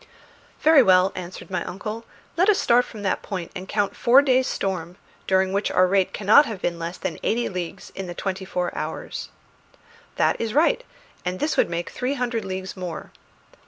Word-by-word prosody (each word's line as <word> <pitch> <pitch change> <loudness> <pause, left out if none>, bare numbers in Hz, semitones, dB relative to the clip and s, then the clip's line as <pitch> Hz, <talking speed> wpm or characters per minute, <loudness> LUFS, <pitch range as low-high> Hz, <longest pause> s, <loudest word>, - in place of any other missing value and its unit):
"Very 310 -2 +7
well," 185 -3 +5
answered 185 +2 -8
my 180 -2 -1
uncle; 215 +4 -6 0.3
"let 370 +5 +3
us 410 - +5
start 245 +1 +4
from 215 -3 -10
that 190 - 0
point 185 -4 -5
and 185 +1 -7
count 205 -2 0
four 255 +4 +5
days' 260 -2 +3
storm, 180 -2 -3 0.3
during 190 0 +2
which 200 +1 0
our 185 - +4
rate 190 0 +2
cannot 215 +9 +5
have 215 -4 -5
been 170 -1 -2
less 170 +2 -5
than 165 - -4
eighty 235 +2 0
leagues 180 -3 -6
in 190 -1 -6
the 175 - -6
twenty 190 0 -3
four 180 -1 -3
hours." - - -5 0.9
"That - - +1
is 225 +1 -2
right; 335 +11 +3 0.4
and 180 +1 -3
this 300 - 0
would - - +2
make 170 0 -3
three 255 +3 -2
hundred 245 -3 -2
leagues 190 0 -5
more." 180 -4 -6
195 Hz, 190 wpm, -24 LUFS, 185-240 Hz, 0.9 s, Very